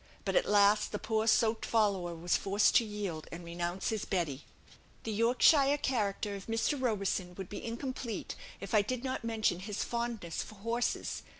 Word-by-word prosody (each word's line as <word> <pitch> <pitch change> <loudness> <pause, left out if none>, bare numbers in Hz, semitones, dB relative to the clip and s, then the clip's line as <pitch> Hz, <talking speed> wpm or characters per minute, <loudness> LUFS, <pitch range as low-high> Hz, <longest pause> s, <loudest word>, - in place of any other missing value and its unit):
But, - - -1
at - - +3
last, 205 +1 +4
the 210 - -2
poor 220 +1 -1
soaked 220 0 +3
"follower" 195 -6 +1
was 170 +2 0
forced 200 +2 +2
to - - +4
yield, 205 -7 -5
and 170 +1 -7
renounce 175 +2 -3
his 220 -2 -2
Betty. 155 -7 -2 0.6
The 225 - -3
Yorkshire 255 +6 +4
character 210 -7 -1
of 200 -1 -8
Mr. 225 +6 +1
Roberson 195 -6 -1
would 190 -1 -7
be 205 - -6
incomplete 235 -2 -4 0.2
if 195 - -7
I 215 - +6
did 245 +4 -3
not 260 -1 -3
mention 220 -6 0
his 205 +2 -3
fondness 235 -8 -3
for 215 - -9
horses. 230 +4 -2
210 Hz, 175 wpm, -32 LUFS, 195-230 Hz, 0.6 s, I